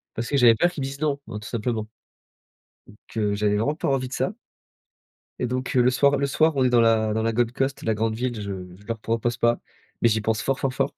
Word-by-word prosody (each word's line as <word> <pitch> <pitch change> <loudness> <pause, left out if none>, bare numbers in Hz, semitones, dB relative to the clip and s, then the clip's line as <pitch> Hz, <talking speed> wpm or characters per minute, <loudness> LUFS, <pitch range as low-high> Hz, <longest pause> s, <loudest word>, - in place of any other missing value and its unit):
parce 115 +1 -3
que - - 0
j'avais 120 -3 +7
peur 175 +10 +3
qu'ils 175 -5 -7
me - - -2
disent 135 +1 -7
non, 145 -2 0
hein, 105 -2 -5
tout 105 - -9
simplement. 115 -1 -2 1.0
Donc 105 - -16 0.2
heu, 105 -2 +1
j'avais 105 0 +1
vraiment 115 +9 0
pas - - -3
envie 130 -2 0
de - - -9
ça. 185 - -1 1.1
Et 125 - 0
donc, 130 +1 -3
heu, 125 - +6
le 125 - +4
soir 140 +2 +3
le 140 0 0
soir, 155 +4 +3
on 130 - +3
est 125 - +3
dans 120 -1 +5
la 110 -1 +3
dans 110 +1 0
la 115 0 +1
Gold 120 +1 +1
Coast, 135 +2 -2
la 110 - +1
grande 110 +1 -1
ville, 125 +2 -2
je 100 -1 -4 0.2
je 100 +2 -19
leur 115 0 -3
propose 115 +2 -1
pas, 120 0 +2 0.4
mais 115 - +5
j'y 110 -1 +1
pense 110 0 0
fort, 135 +4 -1
fort, 135 - -1
fort, 135 +1 -1
120 Hz, 260 wpm, -24 LUFS, 110-135 Hz, 1.1 s, j'avais